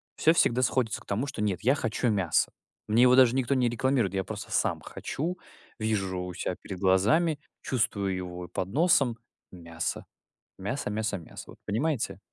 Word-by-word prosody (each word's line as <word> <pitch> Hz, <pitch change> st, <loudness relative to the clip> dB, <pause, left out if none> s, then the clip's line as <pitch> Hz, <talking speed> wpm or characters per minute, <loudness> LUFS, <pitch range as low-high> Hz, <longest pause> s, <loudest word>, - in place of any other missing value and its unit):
всё 160 Hz, -, +4 dB
всегда 130 Hz, -6 st, +3 dB
сходится 125 Hz, -4 st, +1 dB
к -, -, -17 dB
тому, 110 Hz, +8 st, -1 dB
что: 125 Hz, -7 st, -3 dB
"Нет, 95 Hz, -4 st, 0 dB
я 130 Hz, +5 st, +3 dB
хочу 120 Hz, -2 st, -1 dB
мясо". 95 Hz, -7 st, +2 dB, 0.4 s
Мне 115 Hz, +3 st, +4 dB
его 125 Hz, 0 st, +7 dB
даже 130 Hz, -1 st, +6 dB
никто 135 Hz, +1 st, +1 dB
не 125 Hz, -3 st, +2 dB
рекламирует. 120 Hz, -4 st, +1 dB
Я 95 Hz, -, 0 dB
просто -, -, -7 dB
сам -, -, +1 dB
хочу, 175 Hz, +6 st, -4 dB, 0.4 s
вижу 100 Hz, -4 st, -1 dB
у 90 Hz, 0 st, -5 dB
себя -, -, -3 dB
перед 95 Hz, -2 st, -7 dB
глазами, 110 Hz, -, +3 dB, 0.2 s
чувствую 100 Hz, -6 st, 0 dB
его 90 Hz, -1 st, -5 dB
и -, -, -11 dB
под 95 Hz, -, -3 dB
носом 140 Hz, -, +3 dB, 0.3 s
мясо, 85 Hz, -2 st, -4 dB, 0.5 s
мясо 105 Hz, +3 st, -3 dB
мясо 105 Hz, -1 st, -1 dB
мясо, 85 Hz, -, -10 dB
вот -, -, -13 dB
понимаете? 130 Hz, +5 st, -1 dB
110 Hz, 175 wpm, -28 LUFS, 95-130 Hz, 0.5 s, его